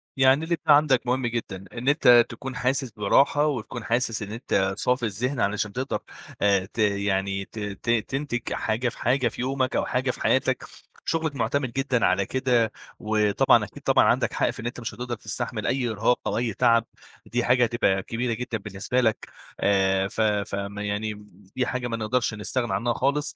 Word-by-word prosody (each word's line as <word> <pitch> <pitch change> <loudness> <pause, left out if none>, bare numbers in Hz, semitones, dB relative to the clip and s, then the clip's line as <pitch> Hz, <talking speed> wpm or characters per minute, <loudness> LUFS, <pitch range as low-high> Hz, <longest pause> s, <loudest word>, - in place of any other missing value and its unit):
يعني 135 +3 +4
اللي 170 +1 0
أنت 160 0 -13
عندَك 145 -4 +5
مهم 125 0 +1
جدًا؛ 100 -5 -4
إن 120 +3 -6
أنت 125 -5 +6
تكون 130 +2 -7
حاسس 130 0 0
براحة 135 +8 +3
وتكون 120 -4 -4
حاسس 115 -2 0
إن 100 - -7
أنت 95 -4 0
صافي 125 -1 +1
الذهن 120 +6 -2
علشان 105 0 0
تقدر 130 +2 -2 0.4
آآ 100 -2 +3
ت 115 - -8
يعني 100 -1 0
ت 110 - -10
ت 105 +2 -5
تِنتِج 120 +2 -1
حاجة 120 +3 -1
في - - -12
حاجة 125 +1 +2
في 115 - -5
يومَك 130 0 -1
أو - - +1
حاجة - - 0
في - - -11
حياتَك، - - +1 0.4
شُغلَك 160 -3 -1
مُعتمِد 125 +1 -1
جدًا 135 -3 +1
على 95 +2 +2
كده 125 -3 +1 0.3
وطبعًا، 105 -1 +3
أكيد - - -10
طبعًا، - - +4
عندَك - - +2
حق - - +1
في - - -6
إن 115 - -6
أنت 120 +1 -4
مش 115 - -5
هتقدر 120 -1 -4
تستحمل 110 0 -4
أي 125 -3 0
إرهاق 115 +3 +1
أو - - -1
أي 120 -2 -1
تعب 115 +3 +3 0.4
ودي 120 +3 -1
حاجة 125 0 +4
هتبقى 110 -5 +1
كبيرة 115 +2 -2
جدًا 120 0 -3
بالنسبة 105 +5 -2
لَك، 110 -2 0 0.3
آآ 95 -1 +2
ف 110 +1 -3
ف 105 -2 0
م 100 +1 -5
يعني 105 +1 -2 0.4
دي 125 -1 +1
حاجة 125 -1 -2
ما 115 - -3
نقدرش 115 +1 0
نستغنى 120 +3 -2
عنّها 120 0 0
خالص 145 +3 -1
120 Hz, 190 wpm, -25 LUFS, 105-125 Hz, 0.4 s, أنت